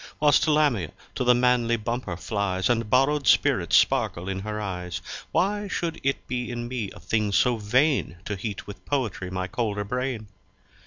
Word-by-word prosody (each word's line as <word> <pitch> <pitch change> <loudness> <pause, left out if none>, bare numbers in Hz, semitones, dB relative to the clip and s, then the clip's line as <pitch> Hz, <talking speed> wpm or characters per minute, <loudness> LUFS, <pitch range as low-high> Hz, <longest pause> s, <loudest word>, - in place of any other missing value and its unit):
Whilst 150 +2 +4
Lamia 145 - +2 0.2
to - - -1
the 125 0 +5
manly 120 -1 +3
Bumper 115 -5 -3
flys 95 +1 -1
And 115 -2 0
borrow'd 135 +2 +3
Spiritts - - +4
sparkle 85 +2 +1
in 95 0 -2
her 105 +2 -4
Eyes, 90 -4 -4 0.3
Why 205 +2 +1
shou'd 170 -3 -3
itt 135 0 -1
be 125 -1 -3
in 120 -1 -4
me 120 -5 -3
a - - -11
thing 105 +3 0
so 120 +4 +3
vain 125 - +1
To 105 - -2
heat 100 +1 -5
with 100 -2 -10
Poetry 115 -10 -2
my 95 0 -2
colder 105 +1 -2
Brain? 125 +1 -3
115 Hz, 170 wpm, -25 LUFS, 100-130 Hz, 0.3 s, the